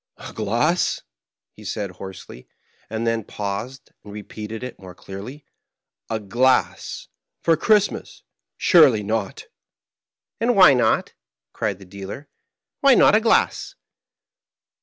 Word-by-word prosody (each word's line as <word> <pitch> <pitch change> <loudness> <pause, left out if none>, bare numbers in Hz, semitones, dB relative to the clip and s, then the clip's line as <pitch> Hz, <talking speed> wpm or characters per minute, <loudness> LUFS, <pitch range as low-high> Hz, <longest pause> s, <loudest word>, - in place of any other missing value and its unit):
"A - - -10
glass," 120 - 0 0.5
he - - -15
said, 100 -3 -4
hoarsely, 95 -8 -11 0.4
and 110 +1 -3
then 115 -1 0
paused, 105 +8 -6
and 105 - -11
repeated 105 +2 -8
it 125 -1 -7
more 90 -2 -12
clearly. 105 +11 -9 0.6
"A 110 - -2
glass! 120 +6 0 0.4
For 165 - +4
Christmas! 205 +4 0 0.3
Surely 135 -11 +5
not!" 110 -1 -3 0.5
" - - -65
And 240 +1 +2
why 185 -7 +8
not? 120 -3 +1 0.2
" - - -68
cried 100 - -2
the 95 - -14
dealer. 100 +9 -9 0.2
" - - -67
Why 275 -3 +6
not - - +6
a 215 - +5
glass 225 0 +1
110 Hz, 130 wpm, -22 LUFS, 100-145 Hz, 0.6 s, why